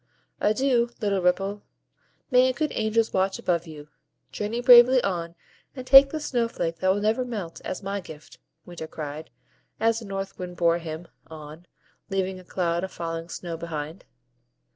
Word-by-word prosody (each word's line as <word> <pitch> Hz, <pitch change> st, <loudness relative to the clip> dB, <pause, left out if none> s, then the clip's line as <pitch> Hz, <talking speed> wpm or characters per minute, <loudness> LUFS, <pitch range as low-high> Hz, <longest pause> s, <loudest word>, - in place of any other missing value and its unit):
"Adieu, 240 Hz, +2 st, +2 dB
little 200 Hz, -4 st, 0 dB
Ripple! 195 Hz, +3 st, 0 dB, 0.7 s
May 255 Hz, +1 st, +5 dB
good 305 Hz, +2 st, -2 dB
angels 220 Hz, 0 st, 0 dB
watch 190 Hz, 0 st, +1 dB
above 170 Hz, -1 st, -1 dB
you! 150 Hz, -2 st, -10 dB, 0.4 s
Journey 210 Hz, +3 st, -3 dB
bravely 245 Hz, +1 st, +8 dB
on, 170 Hz, -3 st, -3 dB, 0.4 s
and 255 Hz, -2 st, -7 dB
take 270 Hz, +1 st, +9 dB
this 310 Hz, 0 st, -5 dB
snow 240 Hz, -4 st, 0 dB
flake 165 Hz, -7 st, -3 dB
that 185 Hz, +2 st, +2 dB
will 200 Hz, -, 0 dB
never 220 Hz, +4 st, +1 dB
melt, 210 Hz, -9 st, -6 dB
as 185 Hz, -, -5 dB
MY 200 Hz, +1 st, -3 dB
gift," 155 Hz, -4 st, -13 dB, 0.3 s
Winter 170 Hz, -2 st, -8 dB
cried, 155 Hz, 0 st, -7 dB, 0.5 s
as 225 Hz, 0 st, +2 dB
the 230 Hz, -, -10 dB
North 195 Hz, -1 st, -5 dB
Wind 180 Hz, -1 st, -7 dB
bore 170 Hz, 0 st, +3 dB
him 165 Hz, 0 st, -7 dB, 0.2 s
on, 155 Hz, +2 st, -11 dB, 0.4 s
leaving 190 Hz, -1 st, -2 dB
a -, -, -13 dB
cloud 175 Hz, -1 st, -1 dB
of 190 Hz, -, -4 dB
falling 165 Hz, 0 st, -5 dB
snow 170 Hz, -1 st, -6 dB
behind. 160 Hz, 0 st, -6 dB
190 Hz, 165 wpm, -25 LUFS, 170-225 Hz, 0.7 s, take